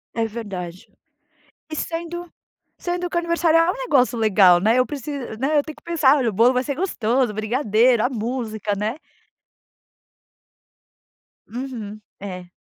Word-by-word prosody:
É 230 - +1
verdade. 200 -4 -7 0.8
E - - -4
sendo, 340 +2 -5 0.5
sendo 355 0 -2
que - - -7
o - - +4
aniversário 335 -1 +2
é 330 - +3
um - - -6
negócio 275 - +2
legal, 195 -5 +5
né, 225 +6 +3
eu 255 - +4
preciso, 275 -5 -6
né, 285 +5 +1
eu - - 0
tenho 310 0 -9
que - - -21
pensar 315 -5 +3
olha 250 -4 +1
o - - -5
bolo 235 +6 +4
vai 250 - +1
ser 280 - -2
gostoso, 255 - 0
o - - -10
brigadeiro, 225 +1 +2
a 250 - +2
música, 220 -3 -3
né. 210 +3 -2 2.5
Uhum, 225 -4 -6 0.2
é. 185 -3 -7
245 Hz, 155 wpm, -22 LUFS, 215-300 Hz, 2.5 s, legal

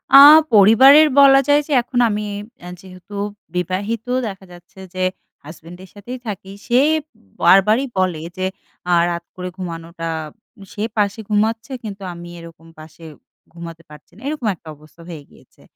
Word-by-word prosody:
আ - - +12 0.4
পরিবারের 260 +9 +7
বলা 270 -1 +7
যায় 290 +1 +4
যে - - -9
এখন 245 +1 -3
আমি 210 0 -3 0.4
আ - - -9
যেহেতু 185 +2 -13 0.4
বিবাহিত, 200 +6 -3 0.2
দেখা 195 -2 -9
যাচ্ছে 175 +2 -17 0.2
যে 185 - -2 0.4
হাসব্যান্ডের 175 +4 -13
সাথেই 240 +5 -9
থাকি। 195 -2 -7
সে 245 +1 +2 0.6
বারবারই 210 +7 +4
বলে 180 -4 -1 0.2
যে, 185 - -2 0.5
আ - - +4
রাত 170 0 -4
করে 180 0 -6
ঘুমানোটা 165 -2 -7 0.6
সে 210 - -5
পাশে 205 +1 0
ঘুমাচ্ছে, 225 +4 -1
কিন্তু 200 -2 -8
আমি 175 0 -11
এরকম 165 -1 -14
পাশে 155 +1 -15 0.5
ঘুমাতে 170 -1 -10
পারছি 150 0 -16
না। 215 - -17
এরকম 290 -6 -3
একটা 160 - -21
অবস্থা 155 +3 -20
হয়ে 155 -4 -9
গিয়েছে। - - -23
190 Hz, 150 wpm, -19 LUFS, 170-220 Hz, 0.6 s, আ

